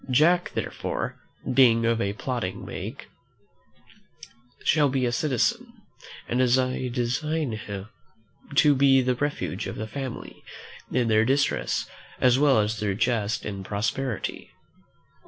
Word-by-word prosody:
Jack, 170 +7 +3
therefore, - - -3 0.3
being 115 -3 +5
of 115 0 +1
a 100 0 -1
plodding 115 -4 -4
make, - - -7 1.6
shall 150 -2 +3
be 130 -1 0
a 120 - 0
citizen: 225 - 0 0.5
and 125 +2 +1
I 130 +1 +2
design 130 +4 -1
him 100 -2 -6 0.7
to 145 +1 +6
be 135 -1 +5
the 125 0 +2
refuge 125 -7 -3
of - - -5
the 110 - -4
family 130 +3 -7 0.5
in 125 -1 +1
their 110 -1 +4
distress, 135 +4 0 0.3
as 125 0 +4
well 145 -3 +5
as 105 +1 0
their 105 -2 -1
jest 110 -1 0
in 100 -2 -5
prosperity. 110 +4 -3
125 Hz, 125 wpm, -26 LUFS, 110-135 Hz, 1.6 s, to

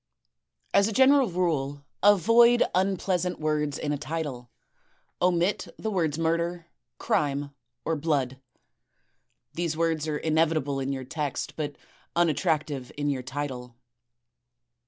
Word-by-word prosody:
As 200 - +5
a - - -2
general 265 +1 +5
rule 145 -6 -1 0.2
avoid 230 +5 +6
impleasant 185 -1 0
words 150 -2 0
in 145 - -2
a 145 - -3
title. 145 -6 -4 0.7
Omit 180 +2 +1
the 220 - -3
words 160 -6 0
Murder, 170 +1 -1 0.3
Crime, 145 -1 0 0.3
or 165 - 0
Blood. 140 -4 -1 1.1
These 165 -1 -2
words 160 -2 0
are 150 -1 -1
inevitable 155 -3 +1
in 135 0 -2
your 135 -1 -4
text, 145 +1 -4
but 150 -2 -4 0.4
unattractive 155 -5 0
in 145 0 0
your 130 -2 -2
title. 130 -2 -5
155 Hz, 115 wpm, -27 LUFS, 145-175 Hz, 1.1 s, avoid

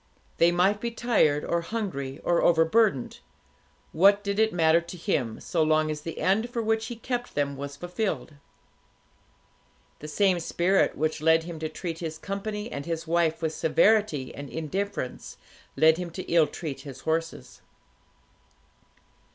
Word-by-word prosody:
They 170 +1 +5
might 190 +4 +2
be 235 - -1
tired, 220 -11 +1
or 170 - 0
hungry, 165 -9 -4
or 175 -1 +2
overburdened; 165 - +2 0.7
what 200 +4 +4
did 200 0 -2
it 220 0 +3
matter 165 -2 +3
to 170 +1 -10
him, 135 - -2
so 170 - -1
long 155 0 +2
as 150 -1 -5
the 165 +1 -7
end 195 +8 +1
for 240 - -4
which 225 0 0
he 240 - -6
kept 245 +1 -4
them 140 -1 0
was 140 +1 -6
fulfilled? 175 0 -3 1.7
The 150 - -8
same 185 +3 +2
spirit 175 +3 +1
which 155 0 -1
led 160 +1 +4
him 165 -1 -7
to 155 0 -3
treat 165 +1 -5
his 160 -2 -5
company 210 +3 -4
and 140 +2 -6
his 165 0 -3
wife 165 -1 +1
with 160 -1 0
severity 160 -4 +2
and 140 -1 -8
indifference, 165 -1 -4 0.4
led 160 0 +5
him 180 -1 -4
to 185 +3 -6
ill 165 -3 +3
treat 150 -5 -6
his 135 -3 -10
horses. 165 +1 -3
170 Hz, 155 wpm, -26 LUFS, 155-200 Hz, 1.7 s, They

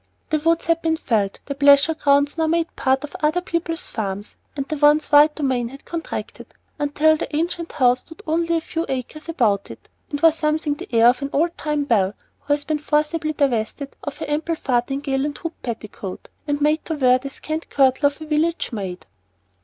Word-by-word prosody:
The 310 - +2
woods 330 +2 +1
had 335 0 +1
been 320 -1 +1
felled, 210 - 0
the 280 - -3
pleasure 280 +2 +5
grounds 285 -1 +2
now 320 -1 +1
made 330 +1 0
part 265 +1 +1
of 295 - -8
other 310 +3 +2
people's 335 -2 -3
farms, 200 -2 -4 0.2
and 275 0 -2
the 310 - -2
once 295 +1 +4
wide 295 +1 +6
domain 260 -5 0
had 275 +4 -12
contracted, 335 -1 -6 0.3
until 295 +2 +3
the 300 - -4
ancient 335 +1 -2
house 250 -4 +3
stood 325 - -14
with 420 - -17
only 335 +1 +1
a - - -2
few 325 +1 -3
acres 270 +5 -5
about 220 - +1
it, - - -12 0.2
and 290 - -3
wore 325 +2 +6
something 305 -1 0
the 290 - -9
air 230 0 +6
of 250 +2 0
an 275 - -2
old 335 +4 +1
time 300 -1 -1
belle 205 -7 +1 0.2
who 290 - 0
has 290 0 -1
been 310 -1 -1
forcibly 305 +1 0
divested 275 -1 -1
of 290 - -5
her - - -4
ample 310 +3 -1
farthingale 270 +1 -1
and 295 0 -3
hooped 330 -1 -7
petticoat, 215 -5 -7 0.2
and 290 0 -1
made 300 +2 +2
to 320 - -2
wear 255 -3 +4
the 275 +2 -6
scant 310 +4 -5
kirtle 270 +1 +3
of 285 +1 -4
a 315 - -7
village 315 +2 0
maid. 190 -5 -5
295 Hz, 205 wpm, -22 LUFS, 265-315 Hz, 0.3 s, wide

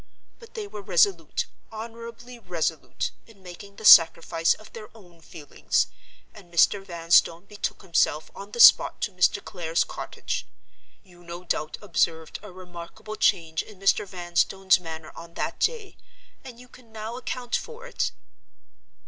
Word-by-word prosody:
But 460 -1 -16
they 435 -2 -4
were 210 - -9
resolute, 175 -3 +1 0.3
honorably 230 +2 -9
resolute, 170 -6 -3 0.2
in 205 -4 -19
making 195 +3 -11
the 220 - -10
sacrifice 165 -1 +6
of 215 0 -16
their 215 -2 -10
own 175 -5 -19
feelings; 150 -2 -2 0.5
and 190 -5 -16
Mr. 195 +3 +3
Vanstone 170 -1 +2
betook 210 0 -5
himself 165 -3 +1
on 200 +1 -10
the 240 - -8
spot - - +7
to 210 - -1
Mr. 180 +2 +1
Clare's 170 -4 -1
cottage.—You 175 -3 -9
no 170 +1 -9
doubt 155 -3 -3
observed 165 -4 -1
a 210 -1 -11
remarkable 180 +3 -10
change 160 -6 +1
in 210 -3 -14
Mr. 195 +1 +2
Vanstone's 185 +1 +1
manner 160 -2 -8
on 170 0 -12
that - - -4
day; 450 -5 -1 0.5
and 245 -3 -11
you 250 - -14
can 245 -2 -19
now 220 +1 -6
account 250 -1 -4
for 475 0 -6
it?" - - -2
190 Hz, 145 wpm, -25 LUFS, 170-220 Hz, 0.5 s, spot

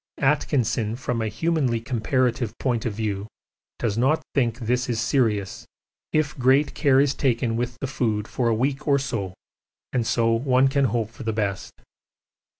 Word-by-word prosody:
Atkinson, 120 -6 +1
from 125 -2 -2
a 110 - -1
humanly 140 -2 0
comparative 120 0 -1
point 120 -3 -1
of 110 - -3
view, 105 -1 -3 0.5
does 115 -2 -1
not 135 +6 +2
think 120 -4 +1
this 125 +1 -1
is 115 -2 0
serious 115 -6 0 0.4
if 155 -2 +1
great 135 +4 +3
care 135 -3 +3
is 140 -1 +3
taken 120 -4 0
with 120 +1 -2
the - - -1
food 110 -5 -1
for 125 - -1
a 115 - +2
week 135 +5 -1
or 140 -1 +4
so, 115 -9 -3 0.6
and 120 -3 0
so 115 -1 +2
one 130 +3 +3
can 140 0 +2
hope 115 -2 -1
for 135 - -13
the 110 -3 -2
best. 100 -3 -2
120 Hz, 165 wpm, -24 LUFS, 115-135 Hz, 0.6 s, or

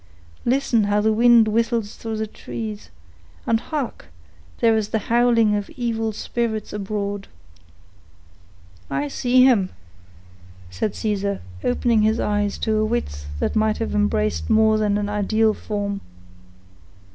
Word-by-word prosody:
Listen 240 -4 +2
how 205 +1 +2
the 220 +1 +2
wind 235 0 +6
whistles 230 -1 0
through 225 -1 -5
the 220 - -1
trees; 215 0 -7 0.6
and 225 -1 +2
hark! 290 -1 -5 0.5
there 230 -1 +4
is 215 -1 -1
the - - 0 0.2
howling 235 -3 +4
of 205 -1 -3
evil 225 -2 -1
spirits 220 0 -3
abroad." 200 -1 -3 1.6
"I 140 +1 -1
see 250 - +3
him," 225 -8 +4 1.0
said 140 - -2
Caesar, 200 -2 -2 0.2
opening 240 -2 +2
his 220 +2 +2
eyes 205 -1 0
to 220 -1 +1
a 215 - +2
width 215 - -3
that - - -1
might 215 0 +2
have 225 - -3
embraced 210 +1 0
more 220 -1 +4
than 205 -1 +1
an 205 0 -1
ideal 215 +2 +1
form. 205 -2 -4
215 Hz, 135 wpm, -22 LUFS, 205-230 Hz, 1.6 s, wind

